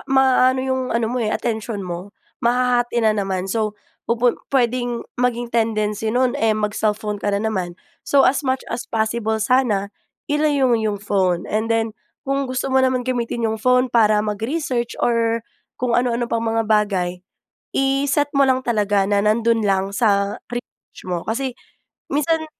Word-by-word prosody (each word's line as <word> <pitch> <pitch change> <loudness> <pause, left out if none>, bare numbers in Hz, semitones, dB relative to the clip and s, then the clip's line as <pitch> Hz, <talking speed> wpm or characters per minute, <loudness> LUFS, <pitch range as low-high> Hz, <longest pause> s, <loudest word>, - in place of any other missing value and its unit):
maano 260 -1 +4
'yung 260 0 0
ano 230 0 +1
mo, 245 +2 -2
eh, 220 - 0
atensyon 220 -3 -3
mo, 180 +3 -6 0.3
mahahati 245 0 +1
na 215 - +5
naman. 195 -3 -2
So, 210 +1 -2 0.3
pupun 235 +1 +1
puwedeng 245 -2 0 0.2
maging 240 -1 0
tendency 220 -2 0
no'n, 250 +2 +2
eh, 220 -1 +2
mag-cellphone 210 0 -1
ka - - -1
na 205 +2 0
naman. 185 -5 -2 0.3
So, 280 -1 +5
as 270 - +3
much 260 -2 -1
as 245 - -5
possible 220 0 0
sana, 215 -3 +1 0.4
ilayo 295 -2 +2
mo 225 - +2
'yung 210 -2 -1
phone. 190 -3 0
And 220 +2 -1
then, 225 -1 0 0.3
kung 275 -1 -1
gusto 255 +1 -2
mo - - +3
naman 255 -1 +1
gamitin 235 -2 -1
yung 220 - -2
phone 250 +3 +3
para 215 -3 +4
mag-research, 235 +4 -2
or 230 -1 +1 0.4
kung 245 -2 +1
ano-ano 240 -1 0
pang 230 0 -1
mga 225 0 +1
bagay, 200 -4 +2 0.7
i-set 275 +2 +1
mo 275 -2 +3
lang 260 0 +2
talaga 205 -4 +1
na 200 +1 +1
nando'n 225 +2 +2
lang 195 0 +1
sa 200 -2 +1
research 245 0 -9
mo. 180 -2 -4
Kasi, 255 +4 -1 0.6
minsan 315 +2 +1
230 Hz, 160 wpm, -21 LUFS, 210-255 Hz, 0.7 s, na